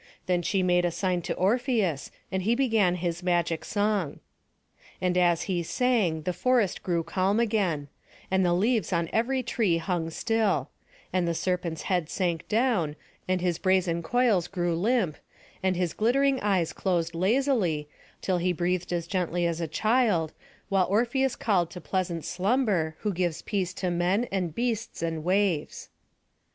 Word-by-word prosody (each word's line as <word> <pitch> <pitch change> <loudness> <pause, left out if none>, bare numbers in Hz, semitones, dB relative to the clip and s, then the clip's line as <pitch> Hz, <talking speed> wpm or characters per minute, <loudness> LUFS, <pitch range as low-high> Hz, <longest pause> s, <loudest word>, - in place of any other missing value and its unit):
Then 180 -1 +1
she 190 +2 0
made 180 -1 +3
a 175 - +2
sign 180 0 -1
to - - -3
Orpheus, 205 - +1 0.2
and 190 0 -1
he 225 +5 +2
began 225 -9 +2
his 175 -1 -3
magic 175 -2 0
song. 205 -6 -1 0.8
And 180 -1 0
as 175 -2 +3
he 180 -3 -1
sung, 190 - +1
the 180 - -1
forest 240 -3 +1
grew 170 -2 0
calm 190 +5 +1
again, 195 -11 0 0.4
and 190 0 +3
the 175 -1 +3
leaves 215 0 +1
on 170 -2 0
every 255 +3 +1
tree 220 -7 +1
hung 165 -1 -2
still; 225 +4 0 0.4
and 180 -2 +1
the 170 - 0
serpent's 175 -2 -2
head 175 -4 0
sank 175 -4 -1
down, 215 - +1 0.3
and 185 -1 0
his 175 -2 0
brazen 185 -3 +2
coils 215 -2 +2
grew 175 -2 -1
limp, 195 - +1 0.4
and 185 -1 +1
his 175 -2 -1
glittering 270 +4 +2
eyes 190 -5 +1
closed 170 -3 -1
lazily, 190 - +1 0.4
till 185 -2 +1
he 180 +1 +1
breathed 180 +1 -1
as 170 -2 -1
gently 175 -1 -1
as 170 0 -1
a 165 - -1
child, 215 -3 +1 0.3
while 195 -2 +2
Orpheus 245 +5 +1
called 180 -6 +1
to 180 - -8
pleasant 175 -1 -2
Slumber, 190 -5 0
who 210 -2 -1
gives 175 -2 -1
peace 190 -4 -1
to 180 -2 -2
men, 180 +7 +1
and 180 -5 -2
beasts, 230 -6 -2
and 165 -2 -2
waves. 185 -3 0
185 Hz, 160 wpm, -27 LUFS, 170-215 Hz, 0.8 s, made